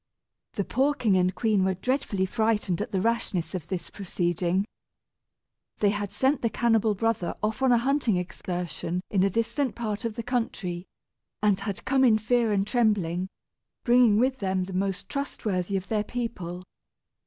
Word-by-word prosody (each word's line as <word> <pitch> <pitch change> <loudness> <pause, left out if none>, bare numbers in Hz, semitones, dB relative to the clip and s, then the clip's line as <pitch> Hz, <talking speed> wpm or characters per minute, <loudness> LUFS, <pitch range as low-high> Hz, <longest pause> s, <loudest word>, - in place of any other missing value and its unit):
The 205 - -1
poor 275 +4 +1
king 220 -8 +2
and 185 0 +2
queen 215 -4 +2
were 190 0 +1
dreadfully 205 -3 0
frightened 210 -3 0
at - - -3
the 190 - -1
rashness 215 -6 -1
of 175 -4 -4
this 175 -2 -4
proceeding. 180 0 -1 1.1
They 205 -1 +3
had 205 -1 -3
sent 270 +2 +1
the 230 - +1
cannibal 225 -2 +2
brother 225 -3 0
off 220 +4 -1
on 265 -1 +4
a 240 - +6
hunting 250 -4 +1
excursion 180 -1 -3
in 195 - +2
a 195 - +3
distant 230 +5 -1
part 215 -1 -3
of 230 -2 -3
the 230 - -4
country, 195 -8 -2 0.6
and 205 -2 +3
had 200 -1 -5
come 265 0 +3
in 230 -4 +6
fear 230 +1 +1
and 200 -1 +2
trembling, 195 -7 +1 0.5
bringing 240 -3 +5
with 260 +3 +2
them 190 -2 0
the 185 +1 -7
most 195 0 -2
trustworthy 200 -9 -2
of 185 0 -5
their 210 0 0
people. 185 -8 -4
210 Hz, 165 wpm, -27 LUFS, 185-235 Hz, 1.1 s, a